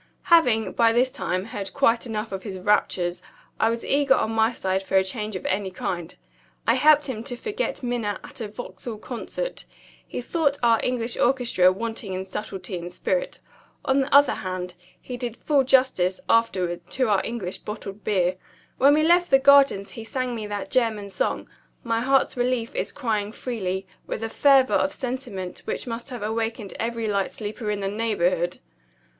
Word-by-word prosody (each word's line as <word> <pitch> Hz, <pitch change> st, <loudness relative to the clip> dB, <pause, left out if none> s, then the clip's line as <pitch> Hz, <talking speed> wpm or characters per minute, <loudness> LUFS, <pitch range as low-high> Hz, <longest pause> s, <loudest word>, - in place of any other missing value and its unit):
Having, 245 Hz, -10 st, +4 dB
by 230 Hz, -1 st, +4 dB
this 250 Hz, +3 st, +2 dB
time, 185 Hz, -4 st, -2 dB
heard 205 Hz, -3 st, -6 dB
quite 230 Hz, +2 st, +3 dB
enough 220 Hz, -1 st, -4 dB
of 195 Hz, -1 st, -4 dB
his 195 Hz, -3 st, -6 dB
raptures, 180 Hz, -2 st, +1 dB, 0.4 s
I 225 Hz, -, +4 dB
was 230 Hz, 0 st, -3 dB
eager 280 Hz, -1 st, +4 dB
on 220 Hz, -, 0 dB
my 225 Hz, +1 st, +3 dB
side 190 Hz, -4 st, -1 dB
for 195 Hz, 0 st, -3 dB
a 190 Hz, -, +5 dB
change 210 Hz, +2 st, -4 dB
of 185 Hz, -, -5 dB
any 195 Hz, 0 st, 0 dB
kind. 175 Hz, -2 st, -4 dB, 0.5 s
I -, -, +4 dB
helped 300 Hz, -1 st, +5 dB
him 230 Hz, -5 st, -4 dB
to 245 Hz, -, -3 dB
forget 430 Hz, -, -3 dB
Minna 235 Hz, -5 st, -2 dB
at -, -, -9 dB
a 220 Hz, -, -3 dB
Vauxhall 215 Hz, 0 st, -7 dB
Concert. 255 Hz, -, -5 dB, 0.4 s
He -, -, -5 dB
thought 285 Hz, +2 st, 0 dB
our 230 Hz, -1 st, +5 dB
English 240 Hz, -1 st, -1 dB
orchestra 240 Hz, -8 st, +3 dB
wanting 225 Hz, 0 st, -4 dB
in 185 Hz, +1 st, -3 dB
subtlety 190 Hz, -2 st, -5 dB
and 175 Hz, +1 st, -7 dB
spirit. -, -, -2 dB, 0.4 s
On 265 Hz, +1 st, +3 dB
the 270 Hz, -, -3 dB
other 280 Hz, -1 st, +6 dB
hand, 185 Hz, -1 st, -4 dB, 0.3 s
he 250 Hz, -, -7 dB
did 240 Hz, -2 st, -4 dB
full 285 Hz, -3 st, +2 dB
justice, 255 Hz, -9 st, +3 dB
afterwards, 185 Hz, -7 st, +1 dB
to 255 Hz, -2 st, +2 dB
our 205 Hz, -3 st, +3 dB
English 210 Hz, -6 st, -4 dB
bottled 210 Hz, -1 st, -7 dB
beer. 185 Hz, -3 st, +1 dB, 0.4 s
When 280 Hz, +2 st, +6 dB
we 310 Hz, -, +3 dB
left 350 Hz, +2 st, +4 dB
the 270 Hz, -, +7 dB
Gardens 275 Hz, -7 st, +5 dB
he 225 Hz, -, -8 dB
sang 255 Hz, +1 st, -3 dB
me 220 Hz, -3 st, -4 dB
that 205 Hz, -1 st, -5 dB
German 220 Hz, -5 st, 0 dB
song, -, -, -1 dB, 0.4 s
'My 230 Hz, -1 st, 0 dB
heart's 270 Hz, +2 st, +2 dB
relief 245 Hz, -2 st, 0 dB
is -, -, -2 dB
crying 215 Hz, -6 st, -2 dB
freely,' 195 Hz, -6 st, -3 dB, 0.2 s
with 225 Hz, -, -4 dB
a 225 Hz, -, -2 dB
fervor 270 Hz, +1 st, +4 dB
of 285 Hz, -, +2 dB
sentiment 245 Hz, -8 st, -5 dB
which -, -, -3 dB
must 235 Hz, +2 st, -5 dB
have 245 Hz, -5 st, -6 dB
awakened 225 Hz, -1 st, -2 dB
every 230 Hz, 0 st, -2 dB
light 200 Hz, -2 st, 0 dB
sleeper 215 Hz, +1 st, -5 dB
in 205 Hz, -1 st, -1 dB
the 195 Hz, -, -1 dB
neighborhood. 195 Hz, -5 st, 0 dB
225 Hz, 180 wpm, -24 LUFS, 195-255 Hz, 0.5 s, the